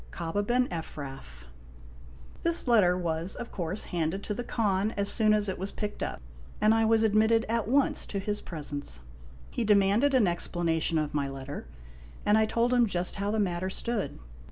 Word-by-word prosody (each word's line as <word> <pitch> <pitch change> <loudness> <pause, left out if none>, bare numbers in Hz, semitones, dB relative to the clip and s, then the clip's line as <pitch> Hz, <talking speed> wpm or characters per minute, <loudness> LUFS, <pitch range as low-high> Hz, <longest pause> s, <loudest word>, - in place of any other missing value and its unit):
KABA 170 +4 -2
BEN 245 +4 +1
EPHRAF. 135 - -7 1.0
This 335 -4 0
letter 195 -7 +4
was 170 +1 -2
of 235 - -7
course 180 +2 -2
handed 175 +3 -1
to 210 - -2
the 245 - -4
Khan 210 -2 0
as 200 0 +3
soon 215 -2 +3
as 210 -1 +2
it 190 - -3
was 195 +2 -3
picked 210 -1 -5
up, - - -3 0.4
and 215 +1 +4
I 225 0 +3
was 225 0 +4
admitted 220 +1 +3
at 230 -1 0
once 275 +3 +2
to 200 - -4
his 205 +1 -2
presence. 145 - -4 0.5
He 240 - -1
demanded 210 +6 +4
an 245 -5 +5
explanation 170 -2 0
of 155 -1 -1
my 140 -2 0
letter, 135 +1 -7 0.6
and 210 - +4
I 220 0 +4
told 235 +3 +1
him 240 -2 +4
just 180 -1 -1
how 200 +1 -1
the 220 - 0
matter 185 -2 0
stood. 225 +2 -2
200 Hz, 180 wpm, -29 LUFS, 170-225 Hz, 1.0 s, an